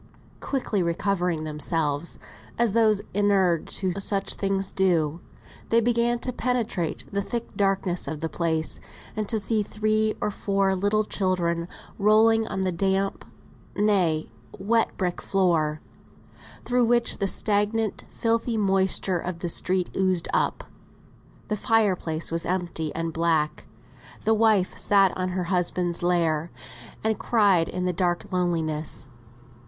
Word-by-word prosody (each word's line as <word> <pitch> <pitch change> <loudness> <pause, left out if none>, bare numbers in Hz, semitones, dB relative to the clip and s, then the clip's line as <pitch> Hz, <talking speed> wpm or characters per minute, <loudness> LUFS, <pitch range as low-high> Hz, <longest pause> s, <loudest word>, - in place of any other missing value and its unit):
Quickly 245 -7 -1
recovering 175 -1 0
themselves, 150 0 -2 0.4
as 235 -4 +2
those 215 -3 +3
inured 190 -4 +2
to 185 -2 -2
such 195 0 0
things 195 -1 -1
do, 170 -4 +1 0.5
they 230 - +4
began 235 +1 +2
to 250 +1 -3
penetrate 230 -10 -1
the 200 0 0
thick 235 +3 -5
darkness 195 -4 0
of 155 +1 -4
the 160 - -2
place, 160 -1 -1 0.4
and 215 -2 -3
to 220 - +1
see 215 +1 +2
three 215 +1 0
or 210 - -1
four 195 -1 0
little 205 +3 +1
children 175 -4 -1 0.3
rolling 220 +2 +4
on 190 - -3
the 185 -1 0
damp, 195 +2 0 0.5
nay 180 - +1 0.3
wet, 225 +3 +2
brick 180 -2 -2
floor, 165 -6 +1 0.8
through 245 0 +2
which 240 0 +2
the 200 - +1
stagnant, 210 +2 0
filthy 230 0 0
moisture 190 -2 +2
of 175 0 -4
the 175 0 -3
street 180 +2 -1
oozed 185 -3 +1
up; - - 0 0.8
the 215 - -1
fire 215 -2 +2
place 160 -2 -3
was 165 0 0
empty 175 -4 -2
and 165 0 -2
black; 160 -2 0 0.6
the 220 - +4
wife 215 -4 +3
sat 195 -2 +4
on 185 0 -2
her 180 0 -2
husband's 175 -1 0
lair, 170 -2 +1 0.5
and 220 -1 0
cried 200 -8 +3
in 180 0 -3
the 180 - 0
dank 175 0 -1
loneliness. 160 -6 -1
190 Hz, 135 wpm, -25 LUFS, 170-215 Hz, 0.8 s, they